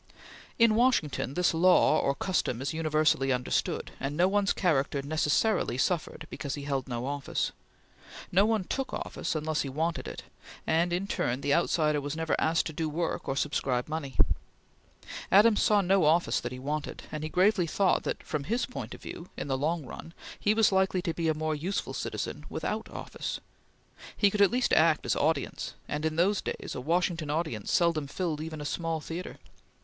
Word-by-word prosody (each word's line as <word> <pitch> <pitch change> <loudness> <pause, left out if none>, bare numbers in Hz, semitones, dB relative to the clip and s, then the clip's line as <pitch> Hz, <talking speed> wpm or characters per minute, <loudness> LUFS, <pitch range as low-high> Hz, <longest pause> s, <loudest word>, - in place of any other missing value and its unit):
In 230 -2 +5
Washington 215 - +1
this 180 -1 +2
law 180 +3 +5
or 140 - +1
custom 140 -6 -1
is 135 +3 -2
universally 155 -4 +2
understood, 125 0 -1
and 140 +2 -3
no 180 +2 +5
one's 200 0 +2
character 140 -5 +1
necessarily 155 - +1
suffered 160 +1 -1
because 140 -1 -4
he 145 - -6
held 140 -2 -2
no 120 -1 -3
office. 140 0 -2 0.8
No 190 +3 +5
one 220 -3 +1
took 270 +8 -3
office - - -3
unless 155 0 0
he 140 - -3
wanted 160 +4 -2
it; - - -7 0.4
and 170 +2 +2
in 180 +3 0
turn 130 -9 -1
the 140 0 +1
outsider 155 -3 +2
was 145 +1 -4
never 160 0 0
asked 160 +1 +2
to 160 - -4
do 160 +1 -2
work 165 +2 -2
or 135 - -1
subscribe 135 -3 0
money. 150 -6 -5 1.1
Adams 210 +2 +6
saw 210 -3 +4
no 190 -1 +3
office 165 +3 +3
that 120 - -5
he 125 - -6
wanted, 145 +3 -4
and 155 - -4
he 155 - -3
gravely 185 +1 +3
thought 190 +3 +2
that, - - -4
from 150 -3 -3
his 235 +3 0
point 250 - -7
of - - -15
view, 170 - -8
in - - -4
the 135 - 0
long 155 +3 -1
run, 165 +5 -9 0.2
he 210 +1 +2
was 220 -2 +4
likely 190 -1 +2
to 170 -3 -1
be 165 0 -1
a 160 - +2
more 155 0 -1
useful 175 +7 -3
citizen - - -4
without - - -3
office. - - -5 0.8
He 200 -2 +4
could 210 - 0
at 200 - +7
least 250 +1 +1
act 160 -1 +4
as - - +1
audience, 150 -1 -1
and, 150 +1 -3
in 155 - -3
those 190 +5 +2
days, - - -5
a - - -5
Washington 170 +1 0
audience 150 -9 -2
seldom 165 -4 +2
filled 155 0 -2
even 155 -1 -6
a - - -5
small 165 +1 -2
theatre. 165 +3 -6
160 Hz, 190 wpm, -29 LUFS, 145-180 Hz, 1.1 s, at